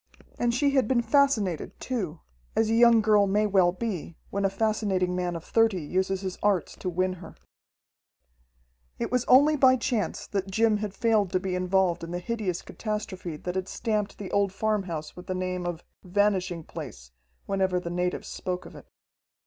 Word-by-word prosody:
And 240 -1 +2
she 280 +4 +2
had 265 -5 +2
been 235 -1 +2
fascinated 230 - +1
too, 190 -11 -3 0.3
as 225 0 +2
a - - +2
young 230 -1 +6
girl 210 -2 +4
may 210 +2 +2
well 190 -4 +4
be, 185 -5 -5
when 200 0 -1
a - - +3
fascinating 195 -3 0
man 180 -1 -1
of 165 - -6
thirty 225 -6 +2
uses 190 +4 -1
his 185 -2 -5
arts 200 -4 +1
to 185 - -3
win 185 +1 0
her. - - -11 1.6
It - - -3
was 250 -1 +1
only 290 +4 +6
by 260 -2 +6
chance 230 -7 -2
that 195 -1 -3
Jim 220 +2 +3
had 205 -1 -4
failed 215 -4 +2
to 185 - +3
be 185 0 -3
involved 180 -1 +1
in 165 - -6
the 175 - -3
hideous 185 -2 -3
catastrophe 210 -7 -5
that 180 +3 -4
had 190 0 -2
stamped 215 -2 -2
the 195 -3 -7
old 200 -1 +2
farmhouse 195 -7 -2
with 180 0 -11
the 185 - -2
name 185 -1 -2
of 175 -1 -5 0.2
"Vanishing 185 -3 0
Place" 60 - -9 0.3
whenever 190 -2 +1
the 170 -1 -5
natives 180 +1 -2
spoke 180 0 -4
of - - -12
it. - - -13
195 Hz, 180 wpm, -27 LUFS, 180-220 Hz, 1.6 s, young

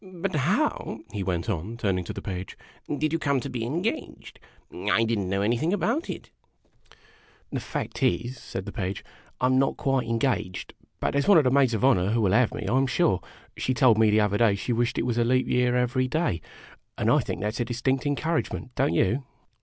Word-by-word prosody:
But 185 0 -5
how," 155 - 0
he 105 - -3
went 90 -3 -2
on, 105 +3 -3
turning 95 -5 0
to - - -5
the - - -7
Page, 95 -2 -5 0.2
" 145 - -6
did 155 +1 0
you 165 - +1
come 140 -3 +1
to - - -6
be 120 -2 -3
engaged? 170 - -4 0.3
I 115 - +1
did 115 -1 0
n't 95 - -2
know 100 +1 0
anything 120 - +1
about 205 - 0
it? - - -7 0.3
" - - -28
" - - -31
The - - 0
fact - - -5
is," 125 -1 +1
said 95 - -6
the - - -6
Page, 95 -4 -4 0.2
" - - -31
I - - +3
'm 130 +1 +4
not 135 - +1
quite 135 -3 0
engaged; 115 -5 -1 0.3
but - - 0
there 140 - +2
's - - -4
one 200 - +7
of 155 - +6
the 125 - +2
maids 130 -4 +3
of 110 - +1
honor 100 -8 +4
who 115 +2 +1
will 100 -3 +2
have 125 0 +4
me, 110 - -5
I 120 - +1
'm 135 0 +3
sure. 130 - +2 0.3
She 130 - -1
told 120 -4 +5
me 110 -1 +5
the 105 +1 +4
other 105 0 +1
day 115 -3 +5
that - - -1
she 105 +5 -2
wished 120 +1 0
it - - 0
was 120 -1 0
leap 130 +2 +2
year 125 0 +2
every 125 +1 +1
day; 140 - 0 0.6
and - - -1
I - - +5
think - - -3
that 105 +1 -1
's - - -6
a 120 - +1
distinct 130 +4 -1
encouragement, 145 -3 -2
don't 85 - +1
you 120 +11 +2
125 Hz, 240 wpm, -26 LUFS, 105-135 Hz, 0.6 s, one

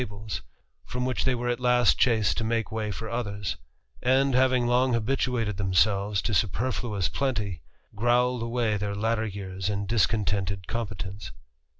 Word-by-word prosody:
203 105 -5 -5
ibles, 110 0 -5 0.4
from 125 0 -3
which 130 -1 -1
they 130 -1 +2
were 120 0 -3
at 120 0 0
last 125 -1 +4
chased 115 -4 +3
to 115 - -2
make 115 0 -1
way 110 -1 -2
for 110 +3 -5
:hers; 105 -4 -3 0.4
and, 135 +2 +3
having 130 -1 +3
long 125 +1 +3
habituated 115 -3 0
themselves 100 +1 +2
to 110 - -1
super 110 +6 +1
nous 105 -7 -1
plenty, 105 -10 -2 0.3
growled 120 +3 +2
away 115 -2 0
their 100 0 -3
latter 110 +1 0
years 95 -1 -4
in 100 0 -2
discontented 100 -3 0
>inpetence. 105 -3 -4
110 Hz, 160 wpm, -27 LUFS, 100-125 Hz, 0.4 s, last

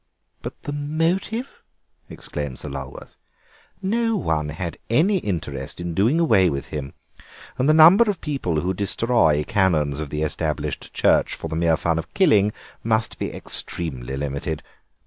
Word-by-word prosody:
"But - - -8
the - - -4
motive?" 165 - -2 0.5
exclaimed 70 -3 -6
Sir - - -7
Lulworth; 70 0 -8 0.7
"no 225 +3 +1
one 75 - -1
had 85 +3 -5
any 180 - +3
interest 75 - -4
in 85 -1 -4
doing 115 - +2
away 105 - +4
with 70 -2 -4
him, 70 -3 -5 0.6
and 130 +4 +3
the - - +6
number 175 +9 +8
of 195 -5 -1
people 95 - -1
who 95 +2 -1
destroy 100 -5 +2
Canons 75 -7 +1
of 75 -2 -4
the 75 +2 -2
Established 75 -1 -3
Church - - +2
for - - -6
the - - -3
mere 80 -1 +2
fun 85 0 0
of - - -8
killing 105 - +4 0.3
must 110 0 0
be - - -2
extremely 65 -6 -4
limited. 70 +2 -3
85 Hz, 150 wpm, -23 LUFS, -, 0.7 s, number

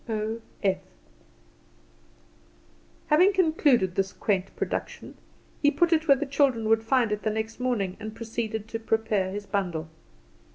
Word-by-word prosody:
"O.F." 215 -3 -2 2.3
Having 360 +6 +5
concluded 300 - +3
this 195 0 -1
quaint 195 -3 -1
production, - - -4 0.5
he 290 - +5
put 330 +4 +2
it 320 0 +1
where 275 -2 +6
the 290 - -2
children 270 -5 +1
would 225 0 +4
find 235 -1 +2
it 210 0 -1
the 215 - 0
next 220 +2 -4
morning, 220 -7 -1
and 215 0 -7
proceeded 220 -2 -4
to 225 - -4
prepare 220 -4 0
his 205 +2 -5
bundle. 175 -6 -2
225 Hz, 135 wpm, -26 LUFS, 205-270 Hz, 2.3 s, where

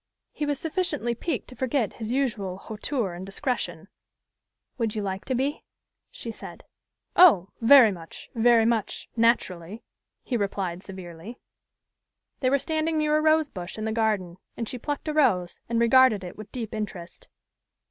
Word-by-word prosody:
He 295 - -3
was 290 -2 -1
sufficiently 325 - -1
piqued 260 +3 -3
to 255 - -11
forget 255 -2 0
his 225 0 -5
usual 220 -9 -1
hauteur 215 0 -3
and 175 +2 -7
discretion. 245 +7 -3 0.9
"Would 225 -2 -1
you 210 - -2
like 190 0 -4
to 260 - -1
be?" 275 +4 -1 0.5
she 230 - -6
said. - - -10 0.5
"Oh! 205 - +7
Very 235 -2 +8
much 165 -3 -10
very 230 -1 +4
much 225 -3 -1
naturally," 215 -4 +1 0.4
he 245 - -1
replied 195 -4 -2
severely. 190 +3 -9 1.0
They 255 - +2
were 280 - +4
standing 315 +2 -1
near 305 0 +2
a 305 - +3
rose 310 -1 +3
bush 180 +1 -7
in 215 - -3
the 220 - -1
garden; 210 -6 0 0.2
and 230 - -3
she 250 - -5
plucked 290 +5 -4
a 305 - -1
rose, 205 - +2
and 235 -1 +1
regarded 235 -3 +5
it 180 - -8
with 215 0 -10
deep 230 -4 -5
interest. 210 - -6
230 Hz, 160 wpm, -26 LUFS, 195-270 Hz, 1.0 s, Very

